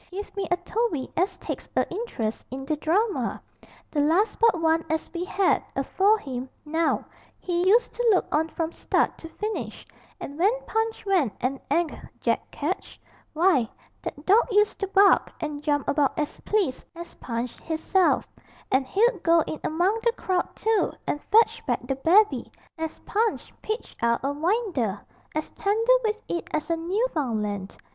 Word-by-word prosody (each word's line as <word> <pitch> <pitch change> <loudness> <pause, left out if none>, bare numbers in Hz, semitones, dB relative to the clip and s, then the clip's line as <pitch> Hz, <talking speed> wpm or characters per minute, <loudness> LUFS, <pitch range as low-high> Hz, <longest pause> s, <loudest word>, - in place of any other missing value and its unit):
Give 400 +3 -7
me 395 -2 -2
a 355 - +2
Toby 360 - -2
as 370 +3 0
takes - - -6
a - - +3
interest 345 - -3
in 270 +2 -6
the 310 - 0
drama! 385 +9 0 0.5
The 300 - -1
last 330 +9 +2
but 455 -7 +4
one 325 0 +2
as 315 0 -2
we 345 0 -2
had, 380 0 +2
afore 410 +3 +3
him, 260 - -6 0.2
now, 320 +2 0 0.3
he 355 0 0
used 465 +3 +4
to 480 -1 +1
look 375 - +3
on 320 +2 +2
from 325 0 -3
start - - 0
to 325 - -9
finish, 425 +5 -5 0.3
and 285 +3 -7
when 380 +4 +5 0.2
Punch 445 0 -1
went 360 - +2
and 265 +2 -1
'anged 340 -1 0 0.2
Jack - - 0
Ketch, 315 +6 -4 0.3
why, 315 -8 +3 0.3
that 290 - -7
dawg 420 +5 +5
used 415 +1 +3
to 395 - -1
bark 395 +1 +5
and 295 -2 -4
jump 290 -2 0
about 285 -2 +1
as 300 -1 -2
pleased 390 -12 0
as 340 0 -9
Punch 235 0 -5
'isself, 340 +4 +2 0.4
and 260 0 +2
he'd 465 - +2
go 335 0 +5
in 310 - -4
among 360 +8 +1
the 470 0 +2
crowd 370 -6 -1
too 445 -1 +1
and 290 - -2
fetch 445 +2 +4
back - - -1
the 270 - -1
babby 390 +10 +3 0.2
as 320 -1 -4
Punch 440 +2 -1
pitched 435 +2 -5
out 235 +1 +2
o' 275 - +1
winder, 300 - 0 0.4
as 310 - -2
tender 445 +4 +2
with 435 -1 0
it 345 - -3
as 310 +2 -2
a - - +3
Newfunland! 275 - -2
340 Hz, 165 wpm, -26 LUFS, 295-415 Hz, 0.5 s, when